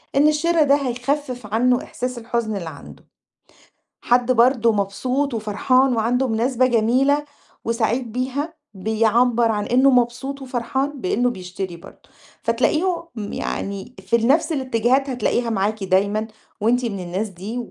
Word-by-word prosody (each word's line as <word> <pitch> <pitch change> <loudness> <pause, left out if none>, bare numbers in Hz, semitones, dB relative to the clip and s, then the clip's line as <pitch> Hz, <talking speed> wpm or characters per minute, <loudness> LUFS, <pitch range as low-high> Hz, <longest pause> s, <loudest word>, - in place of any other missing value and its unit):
إن 290 +2 +5
الشِرا 315 +2 +3
ده 280 -1 +4
هيخفّف 255 -2 -2
عنّه 245 +2 +2
إحساس 250 0 -5
الحُزن 230 -2 -2
اللي 170 -4 -4
عنده. 145 - -13 1.0
حد 245 +1 +2
برضه 235 -1 +4
مبسوط 250 +7 -1
وفرحان 245 +4 +2
وعنده 245 +4 +1
مناسبة 245 +2 +1
جميلة 255 +5 +2 0.4
وسعيد 230 +1 0
بيها، 265 +7 -3 0.2
بيعبَّر 225 +3 +2
عن 210 -1 -1
إنه 260 +3 +4
مبسوط 250 +2 0
وفرحان 265 +2 -3
بإنّه 245 +7 +1
بيشتري 180 -3 -6
برضه، 170 - -16 0.3
فتلاقيهم 320 +10 +1 0.3
يعني 200 +5 -4
في 190 +5 0
ال 230 0 +2
نَفْس 320 +5 +3
الاتجاهات 260 0 +1
هتلاقيها 245 -1 0
معاكِ 210 0 -1
دايمًا 200 +3 +1 0.3
وأنتِ 245 +3 +2
من 205 -4 -3
الناس 185 +4 -3
دي 195 +6 -7
240 Hz, 130 wpm, -21 LUFS, 220-265 Hz, 1.0 s, إن